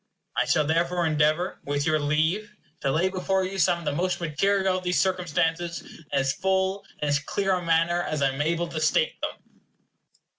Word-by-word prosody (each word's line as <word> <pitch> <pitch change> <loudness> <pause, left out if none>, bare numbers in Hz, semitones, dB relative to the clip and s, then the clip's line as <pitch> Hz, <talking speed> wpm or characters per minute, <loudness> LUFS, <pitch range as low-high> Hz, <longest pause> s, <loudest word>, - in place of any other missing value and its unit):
I - - +2
shall 155 - +2
therefore 170 +3 +1
endeavor, 155 +3 +1
with 145 0 -1
your 155 0 +2
leave, 160 +9 0 0.2
to 135 - -1
lay 170 +6 +2
before 190 0 0
you 190 +1 -4
some 170 +1 +3
of 170 - -10
the - - +1
most 180 +5 -1
material 190 +4 +1
of - - -14
these 180 -4 +1
circumstances 170 -1 0
in 165 - -15
as 135 -1 +1
full 190 +1 0 0.2
and 150 - 0
as 145 0 +2
clear 195 +7 -1
a 180 - 0
manner 170 +1 +2
as 155 -4 -2
I 135 - +4
am 135 +2 -3
able 170 +3 0
to 155 - -4
state 485 - +1
them. - - -7
170 Hz, 195 wpm, -26 LUFS, 155-185 Hz, 0.2 s, I